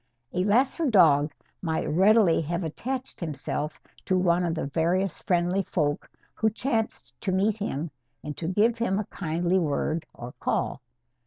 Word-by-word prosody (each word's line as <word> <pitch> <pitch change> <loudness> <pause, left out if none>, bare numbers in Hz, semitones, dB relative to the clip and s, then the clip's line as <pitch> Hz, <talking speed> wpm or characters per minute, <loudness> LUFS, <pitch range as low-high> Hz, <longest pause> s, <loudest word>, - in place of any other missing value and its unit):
A 180 - +1
lesser 265 - +2
dog 155 - +5 0.3
might 160 -3 -1
readily 190 +1 +4
have 170 +3 -2
attached 255 - -4
himself 150 -1 -3 0.3
to 185 - +2
one 180 -1 +3
of 165 -2 0
the 160 - -2
various 170 +5 0
friendly 180 +2 +1
folk 150 -6 -1 0.2
who 220 - +1
chanced 225 0 -2
to 190 - -1
meet 200 +3 +2
him 165 -7 -3 0.3
and 150 -1 -5
to 165 - -4
give 220 +6 +2
him 215 -5 +1
a 210 - -1
kindly 175 +1 0
word 155 0 -1
or 120 +1 -8
call. - - -1
180 Hz, 155 wpm, -26 LUFS, 160-210 Hz, 0.3 s, dog